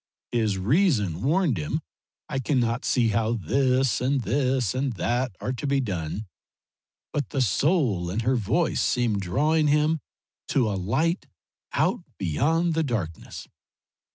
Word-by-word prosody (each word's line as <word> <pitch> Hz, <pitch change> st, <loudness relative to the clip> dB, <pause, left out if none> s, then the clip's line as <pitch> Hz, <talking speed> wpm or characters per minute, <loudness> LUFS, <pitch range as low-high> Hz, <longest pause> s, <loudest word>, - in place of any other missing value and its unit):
His 110 Hz, -5 st, +1 dB
reason 105 Hz, -, +2 dB
warned 155 Hz, -, +2 dB
him 75 Hz, -, -2 dB, 0.5 s
I 135 Hz, -, -2 dB
cannot 125 Hz, -3 st, 0 dB
see 120 Hz, -3 st, +2 dB
how 110 Hz, +1 st, +1 dB
this 130 Hz, -, +1 dB
and 135 Hz, +1 st, +1 dB
this 130 Hz, -3 st, +1 dB
and 130 Hz, 0 st, -1 dB
that 120 Hz, +1 st, -1 dB
are 125 Hz, -, -2 dB
to 130 Hz, +3 st, -4 dB
be 140 Hz, 0 st, +2 dB
done, 95 Hz, -3 st, -3 dB, 0.9 s
but 145 Hz, -3 st, -2 dB
the 140 Hz, -, -2 dB
soul 120 Hz, -, +1 dB
in 100 Hz, +6 st, -1 dB
her 125 Hz, +3 st, +2 dB
voice 120 Hz, -, +1 dB
seemed 115 Hz, -5 st, +1 dB
drawing 150 Hz, -, +2 dB
him 150 Hz, +2 st, +2 dB, 0.5 s
to 130 Hz, -5 st, +2 dB
a -, -, -1 dB
light 135 Hz, -, 0 dB, 0.5 s
out -, -, +2 dB, 0.2 s
beyond 160 Hz, -, +1 dB
the 160 Hz, -, +1 dB
darkness. 105 Hz, -, -4 dB
125 Hz, 140 wpm, -25 LUFS, 105-145 Hz, 0.9 s, reason